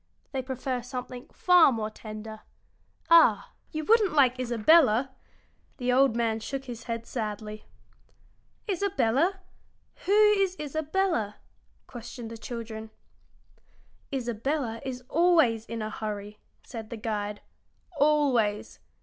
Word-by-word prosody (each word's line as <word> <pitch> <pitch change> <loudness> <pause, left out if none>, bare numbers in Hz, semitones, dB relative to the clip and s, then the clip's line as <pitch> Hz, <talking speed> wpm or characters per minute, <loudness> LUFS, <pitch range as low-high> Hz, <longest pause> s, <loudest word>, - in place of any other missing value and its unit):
They 265 -2 -2
prefer 260 -1 -3
something 250 0 -7
far 360 -5 +5
more 220 -3 -3
tender. 215 0 -9 0.7
Ah, 225 -12 +6 0.2
you 310 0 -4
wouldn't 435 -3 +4
like 260 -4 +4
Isabella!" 255 +1 +4 0.7
The 250 -1 0
old 265 -2 +4
man 225 -2 0
shook 270 +4 -5
his 235 -3 -8
head 230 -1 -4
sadly. 215 -2 -5 1.0
"Isabella! 360 - +1 0.7
Who - - +1 0.2
is 390 -2 +1
Isabella?" 305 - -1 0.5
questioned 240 -1 -9
the 230 - -7
children. 225 -1 -7 1.2
"Isabella 245 -1 -2
is 250 -1 -5
always 315 -10 +3
in 230 -1 -4
a 215 - -4
hurry," 210 -1 -6 0.2
said 225 -3 -8
the 235 - -6
guide 210 -2 -3 0.6
"always. 270 -8 +2
245 Hz, 110 wpm, -27 LUFS, 220-290 Hz, 1.2 s, Ah